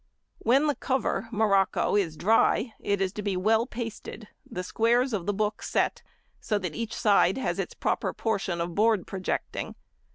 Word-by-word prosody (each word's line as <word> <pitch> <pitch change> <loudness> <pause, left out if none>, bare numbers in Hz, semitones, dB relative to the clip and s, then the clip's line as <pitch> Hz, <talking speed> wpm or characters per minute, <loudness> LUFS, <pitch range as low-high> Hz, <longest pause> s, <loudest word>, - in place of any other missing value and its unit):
When 265 +6 +3
the 295 - +2
cover 260 -4 -1
(morocco) 200 -4 +2
is 170 -7 0
dry, 225 +2 +3
it 200 -1 -1
is 190 0 0
to 210 - -5
be 200 -2 -1
well 220 +5 +2
pasted, 225 -2 -7 0.2
the 180 - -4
squares 235 +6 +2
of 185 -5 -2
the - - +3
book 210 +1 -1
set, - - 0 0.4
so 210 - -1
that 180 -5 -4
each 230 -1 -4
side 200 -3 +3
has 265 - -2
its - - -3
proper - - -1
portion 200 -6 -2
of 170 0 -3
board 215 -1 +2
projecting. 190 -1 -4
210 Hz, 170 wpm, -27 LUFS, 195-230 Hz, 0.4 s, When